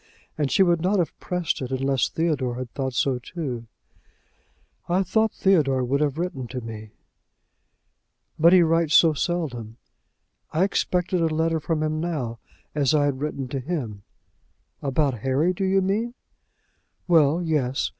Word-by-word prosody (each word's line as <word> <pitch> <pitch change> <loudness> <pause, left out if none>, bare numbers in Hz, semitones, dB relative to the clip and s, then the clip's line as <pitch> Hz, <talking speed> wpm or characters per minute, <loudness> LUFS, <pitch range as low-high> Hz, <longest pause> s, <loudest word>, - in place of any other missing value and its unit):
And 145 -3 -1
she 195 - +5
would 170 -2 +2
not 190 +4 +2
have 175 -3 -1
pressed 180 -5 -2
it, 130 - -4
unless 135 0 +1
Theodore 145 -7 -1
had 125 -1 -6
thought 130 -2 -3
so 130 0 +1
too!" 125 -5 -5 1.2
"I 185 +3 +2
thought 220 +4 +1
Theodore 145 -9 +2
would 135 +4 0
have 145 -1 0
written 160 -8 -3
to 125 +2 -5
me!" 110 -2 -8 1.5
"But 165 +2 +6
he 180 -1 +7
writes 165 -1 +2
so 165 -2 +6
seldom." 135 -9 -3 0.7
"I 160 +4 +2
expected 180 -2 0
a 165 - +3
letter 160 +1 0
from 155 0 -1
him 155 0 -1
now, 140 -9 -3 0.3
as 145 0 +2
I 145 -1 +3
had 140 -2 -1
written 140 -3 -3
to 135 - -3
him." 125 - -4 0.8
"About 135 -3 0
Harry, 135 - +1
do 190 - -3
you 190 0 +2
mean?" 220 +6 -1 0.9
"Well; 160 -2 +4
yes. 140 -5 0
150 Hz, 155 wpm, -24 LUFS, 130-175 Hz, 1.5 s, he